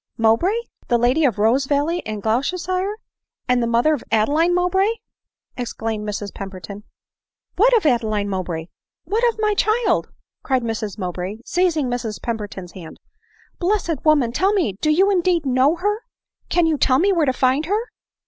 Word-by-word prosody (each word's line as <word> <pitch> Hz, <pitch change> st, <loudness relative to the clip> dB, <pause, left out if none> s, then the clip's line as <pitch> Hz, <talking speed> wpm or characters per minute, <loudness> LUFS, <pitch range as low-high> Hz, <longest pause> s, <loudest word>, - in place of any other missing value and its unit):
" -, -, -56 dB
Mowbray! 230 Hz, -, +3 dB, 0.2 s
— -, -, -33 dB
The 240 Hz, -, +4 dB
lady 250 Hz, +6 st, +2 dB
of 245 Hz, -7 st, +2 dB
Rosevalley 280 Hz, +9 st, +1 dB
in 215 Hz, -1 st, -4 dB
Gloucester 245 Hz, -, 0 dB
shire; 370 Hz, +3 st, -2 dB, 0.5 s
and 250 Hz, -1 st, +2 dB
the 235 Hz, -, 0 dB
mother 235 Hz, +7 st, +3 dB
of 285 Hz, -, -3 dB
Adeline 300 Hz, +11 st, +2 dB
Mowbray? 380 Hz, +4 st, +2 dB, 0.3 s
" -, -, -47 dB
exclaimed 225 Hz, -3 st, -3 dB
Mrs 205 Hz, -1 st, -5 dB
Pemberton. 195 Hz, +1 st, -8 dB, 0.3 s
" -, -, -56 dB
What 475 Hz, +5 st, +5 dB
of 425 Hz, -, -2 dB
Adeline 220 Hz, -6 st, +1 dB
Mowbray? 180 Hz, -4 st, -3 dB, 0.4 s
What 440 Hz, +4 st, -1 dB
of -, -, -23 dB
my 425 Hz, -1 st, +2 dB
child 435 Hz, +3 st, +1 dB, 0.2 s
?" -, -, -67 dB
cried 260 Hz, -3 st, 0 dB
Mrs 220 Hz, -2 st, -3 dB
Mowbray, 185 Hz, +3 st, -5 dB
seizing 340 Hz, -6 st, +1 dB
Mrs 240 Hz, -3 st, -3 dB
Pemberton's 205 Hz, -6 st, -5 dB
hand. 170 Hz, -4 st, -11 dB, 0.3 s
" -, -, -33 dB
Blessed 350 Hz, -5 st, -1 dB
woman! 290 Hz, -7 st, +3 dB
tell 380 Hz, -, +1 dB
me 355 Hz, -, +1 dB
— -, -, -49 dB
Do 305 Hz, -, +1 dB
you 380 Hz, +6 st, +4 dB
indeed 350 Hz, -4 st, +1 dB
know 265 Hz, +4 st, +3 dB
her? 415 Hz, +4 st, -1 dB, 0.5 s
—can 350 Hz, -1 st, +3 dB
you 315 Hz, -3 st, +1 dB
tell 255 Hz, -, +3 dB
me 390 Hz, +7 st, +3 dB
where 325 Hz, -5 st, +2 dB
to -, -, +4 dB
find 260 Hz, +4 st, +1 dB
her 430 Hz, +6 st, -1 dB
265 Hz, 185 wpm, -21 LUFS, 220-360 Hz, 0.5 s, What